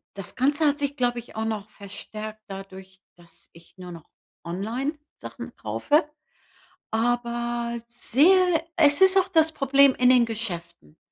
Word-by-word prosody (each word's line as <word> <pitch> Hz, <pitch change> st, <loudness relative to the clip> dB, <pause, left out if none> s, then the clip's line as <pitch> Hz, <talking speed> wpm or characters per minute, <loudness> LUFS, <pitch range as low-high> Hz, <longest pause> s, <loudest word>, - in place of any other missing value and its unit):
das 195 Hz, -2 st, -8 dB
Ganze 290 Hz, +4 st, +1 dB
hat 290 Hz, 0 st, +2 dB
sich, 285 Hz, -1 st, -2 dB
glaube 245 Hz, -2 st, 0 dB
ich 240 Hz, -, -13 dB
auch 220 Hz, 0 st, -2 dB
noch 215 Hz, -2 st, -4 dB
verstärkt 215 Hz, +1 st, -9 dB
dadurch, 190 Hz, -1 st, -10 dB, 0.2 s
dass 170 Hz, -1 st, -19 dB
ich 170 Hz, +2 st, -19 dB
nur 180 Hz, -1 st, -9 dB
noch 165 Hz, -3 st, -12 dB, 0.3 s
online 225 Hz, -, -3 dB, 0.2 s
Sachen -, -, -9 dB
kaufe, 300 Hz, +1 st, 0 dB, 0.8 s
aber 235 Hz, 0 st, -1 dB
sehr 330 Hz, -, +3 dB
es 290 Hz, -1 st, +4 dB
ist 380 Hz, 0 st, +6 dB
auch 380 Hz, -1 st, +3 dB
das 320 Hz, -4 st, +3 dB
Problem 275 Hz, -2 st, +4 dB
in 250 Hz, 0 st, +3 dB
den 250 Hz, -2 st, +5 dB
Geschäften. 175 Hz, -, -5 dB
235 Hz, 145 wpm, -25 LUFS, 195-285 Hz, 0.8 s, ist